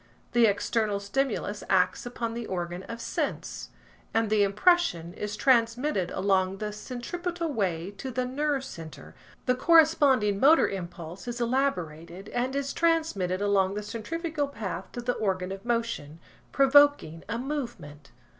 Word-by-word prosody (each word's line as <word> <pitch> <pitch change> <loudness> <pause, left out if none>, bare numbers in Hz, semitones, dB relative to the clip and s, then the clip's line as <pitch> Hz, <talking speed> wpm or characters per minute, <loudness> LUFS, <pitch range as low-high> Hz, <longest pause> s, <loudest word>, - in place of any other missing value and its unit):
The 240 -1 +5
external 205 0 0
stimulus 205 0 -2
acts 185 +4 +2
upon 235 -1 -4
the 235 -1 -5
organ 175 -1 -4
of 230 0 -6
sense, 230 - -3 0.5
and 225 -1 +1
the 215 -1 +4
impression 200 - +2
is 210 +1 -4
transmitted 235 -4 +2
along 190 -1 +1
the 210 +1 -4
centripetal 335 - -4
way 185 -5 -1
to 265 - -4
the 255 0 -1
nerve 280 +1 -1
centre–the 170 +4 -6
corresponding 280 - +4
motor 305 +7 +6
impulse 175 0 -7
is 240 0 -4
elaborated, 190 - -2
and 250 +2 -2
is 280 0 -2
transmitted 315 - +1
along 195 -1 +2
the 210 - -3
centrifugal 305 +8 -3
path 215 -8 -6
to 245 - -4
the 245 +1 0
organ 190 -4 -1
of 195 0 -7
motion, 230 -11 -2 0.3
provoking 275 - +4
a 230 - -1
movement. 235 - -5
230 Hz, 135 wpm, -27 LUFS, 190-270 Hz, 0.5 s, motor